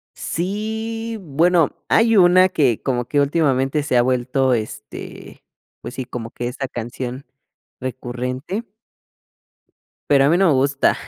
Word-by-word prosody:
Sí, 220 +5 -3
bueno, 165 0 +2
hay 225 0 +4
una 185 0 +6
que 135 - +1
como 125 -3 -1
que 145 +3 +1
últimamente 140 -1 +1
se 130 -4 +1
ha - - +6
vuelto 130 +1 +1
este, 110 -1 -6 0.4
pues - - -7
sí, 130 - -5
como 115 -1 -7
que 120 - -4
esa 135 +2 -4
canción 125 +2 -6 0.5
recurrente 130 - -4 1.4
pero 140 -1 +5
a - - +4
mí 170 - +4
no 195 0 +4
me 155 - +4
gusta. 140 +1 +2
140 Hz, 135 wpm, -20 LUFS, 125-180 Hz, 1.4 s, una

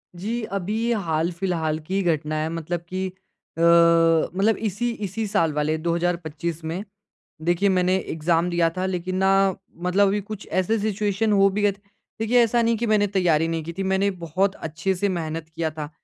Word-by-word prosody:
जी। 225 +7 -3 0.2
अभी 195 +3 -3
ये 240 - +2
हाल-फिलहाल 165 -1 -1
की 195 +1 0
घटना 155 -3 0
है 160 - -1
मतलब 165 +1 -3
कि 190 +1 -2 0.5
अ, - - -2 0.7
मतलब 200 +4 +1
इसी 240 +5 -2 0.2
इसी 220 +4 -3
साल 165 -7 +1
वाले 150 +1 0
2025 170 -1 -2
में। 170 +5 -4 0.6
देखिए 175 +4 +2
मैंने 185 0 +2
एग्ज़ाम 165 +1 0
दिया 170 -1 +2
था 185 - 0
लेकिन 185 0 -2
ना 190 0 +3 0.6
मतलब 195 +2 +3
अभी 205 +2 +1
कुछ 210 0 -8
ऐसे 190 +5 +1
सिचुएशन 210 0 0
हो 195 0 +5
भी 205 +2 -2
गए 205 -1 +4
थे 200 +1 -16 0.4
देखिए 240 +2 +4
ऐसा 235 +1 +2
नहीं 230 0 +2
कि 235 - -1
मैंने 210 -1 +3
तैयारी 170 -5 +2
नहीं 165 -1 -2
की 170 +1 -6
थी 195 - -1
मैंने 190 +1 +1
बहुत 190 +5 0
अच्छे 160 +5 -2
से 200 +2 0
मेहनत 165 -2 -4
किया 160 -1 -3
था। 150 -1 -6
180 Hz, 185 wpm, -23 LUFS, 165-200 Hz, 0.7 s, हो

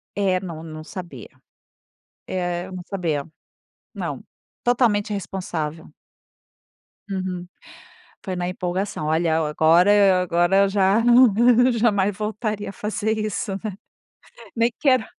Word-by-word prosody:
É, 190 -2 +1
não, 165 -4 -7
não 155 -1 -8
sabia. 170 - -9 1.0
É 175 -1 -3
eu 190 - -11
não 185 -1 -6
sabia, 165 -7 -2 0.7
não, - - -5 0.4
totalmente 230 -4 +2
irresponsável. 175 -6 -5 1.2
Uhum. 185 -2 -4 0.8
Foi 185 -1 -4
na 175 0 -2
empolgação, 180 -2 -3
olha 160 +1 +1
agora 180 +6 +4
agora 175 +1 +2
eu 200 0 +4
já, 195 +2 +3
não 240 +1 +5
jamais 205 -4 +2
voltaria 210 0 -3
a - - -6
fazer 215 +2 -2
isso, 215 -2 -3 1.0
Nem 230 +1 +2
quero 255 -5 +3
190 Hz, 110 wpm, -22 LUFS, 175-215 Hz, 1.2 s, não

